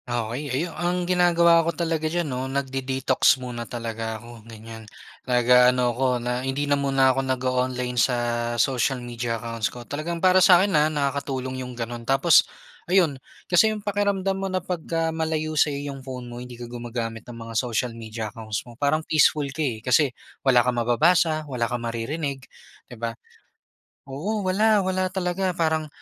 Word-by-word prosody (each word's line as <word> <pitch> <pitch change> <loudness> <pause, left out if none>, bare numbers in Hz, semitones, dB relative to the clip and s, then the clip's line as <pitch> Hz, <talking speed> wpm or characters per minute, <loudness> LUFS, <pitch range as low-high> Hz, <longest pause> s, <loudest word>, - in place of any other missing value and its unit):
Okey 120 +4 -3
ayu 160 +7 -2
ang 175 0 -1
ginagawa 170 -2 +4
ko 165 0 -3
talaga 160 -2 -1
diyan 175 +1 -1
'no, 130 -2 -3
nagde-detox 135 -1 +1
muna 120 -2 -6
talaga 115 -1 -4
ako, 115 +1 -12
ganiyan. 110 0 -11 0.4
Nag-aano 125 0 +4
ako 130 +3 0
na 125 +1 -2
hindi 135 +2 -2
na 145 - +1
muna 135 -2 +3
ako 135 - 0
nag-o-online 125 -1 -1
sa 125 - +2 0.4
social 130 +2 +1
media 120 -1 -4
accounts 115 -1 -3
ko. 120 -1 -10
Talagang 155 +6 -4
para 185 +2 +4
sa'kin, 185 +2 +6
ah, 150 0 +4
nakakatulong 140 -3 -2
'yung 125 -1 -7
gano'n, 120 0 -5
tapos 135 +7 +4 0.4
ayun, 170 -8 +2 0.2
kasi 180 +5 +4
'yung 215 -1 -5
pakiramdam 195 -2 0
mo 195 - -2
na 185 - -1
pagka 165 -2 -2
malayo 160 -1 -2
sa 150 0 +3
iyong 140 -1 -5
phone 130 -1 -7
mo 120 0 -8
hindi 125 -1 -9
ka 120 - -7
gumagamit 120 -1 -5
ng 120 - -8
mga 115 0 -8
social 120 +1 -1
media 110 -1 -6
accounts 110 -2 -5
mo 120 - -12
parang 145 +5 0
peaceful 155 -1 +3
ka, 160 - -4
eh, 115 -7 -2
kasi 130 +3 +4 0.3
wala 125 -3 +4
kang 125 -1 +1
mababasa, 155 +6 +2
wala 125 -5 -2
kang 120 -1 -3
maririnig, 135 +5 -3 0.5
di 120 - -10
ba? 115 0 -3 0.9
Oo, 185 +11 -3
wala, 205 +2 +3
wala 185 0 0
talaga 185 0 -2
parang, 160 -2 0
135 Hz, 170 wpm, -24 LUFS, 120-165 Hz, 0.9 s, sa'kin